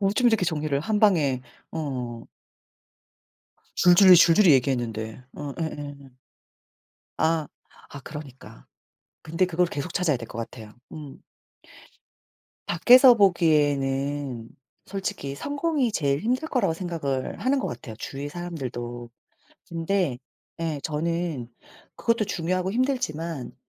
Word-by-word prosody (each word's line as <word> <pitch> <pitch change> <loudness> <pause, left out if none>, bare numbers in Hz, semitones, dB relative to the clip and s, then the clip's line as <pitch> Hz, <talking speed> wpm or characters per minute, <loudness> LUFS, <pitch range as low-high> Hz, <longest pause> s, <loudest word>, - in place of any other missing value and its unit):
어쩜 210 +5 +3
이렇게 220 -5 +2
정리를 150 -4 -1
한방에 170 - +2 0.3
어. 125 -7 -4 1.6
줄줄이 180 +1 +8
줄줄이 170 +1 +6
얘기했는데. 120 -3 -1
어 145 -2 -6
예예. 145 -3 -6 1.1
아 160 -1 +1 0.4
아 140 - -9
그러니까. 135 - -11 0.6
근데 165 +4 +1
그걸 180 0 +1
계속 165 +1 -5
찾아야 170 -7 +1
될 115 - -8
것 - - -10
같아요. 110 -2 -8 0.2
음. 150 -3 -9 1.5
밖에서 245 +9 +7
보기에는 145 - +1 0.4
솔직히 190 -8 -4
성공이 285 - -1
제일 140 -5 +1
힘들 250 - -1
거라고 200 -11 +1
생각을 160 -7 -3
하는 260 +6 +1
것 - - -2
같아요, 115 -7 -8
주위에 140 +4 -6
사람들도. 125 -8 -6 0.6
근데 170 -4 -1 0.4
예 160 -3 -2
저는 160 -4 -2 0.5
그것도 230 -2 +1
중요하고 185 0 -1
힘들지만 170 - -2
160 Hz, 250 characters per minute, -25 LUFS, 135-185 Hz, 1.6 s, 줄줄이